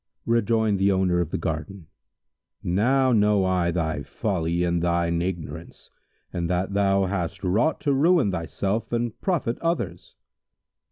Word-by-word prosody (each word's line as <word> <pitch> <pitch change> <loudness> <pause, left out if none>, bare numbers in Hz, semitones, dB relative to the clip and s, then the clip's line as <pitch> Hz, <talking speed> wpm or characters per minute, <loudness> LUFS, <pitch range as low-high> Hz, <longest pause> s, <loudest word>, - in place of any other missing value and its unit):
Rejoined 110 -3 +2
the 100 +1 +3
owner 95 -2 +2
of 85 -3 -1
the - - -2
garden, 80 +2 -4 0.8
"Now 130 +9 +2
know 105 -3 +3
I 90 -2 +1
thy 80 -3 -1
folly 85 -1 -1
and 85 -1 0
thine 85 -1 +1
ignorance 85 -3 -6 0.4
in 85 -1 -2
that 90 +2 -1
thou 100 -1 +2
hast 95 0 -3
wrought 105 - +1
to 145 - +1
ruin 150 - +3
thyself 95 +5 -2
and 120 -1 -2
profit 160 - -1
others." 170 0 -3
95 Hz, 135 wpm, -25 LUFS, 85-115 Hz, 0.8 s, the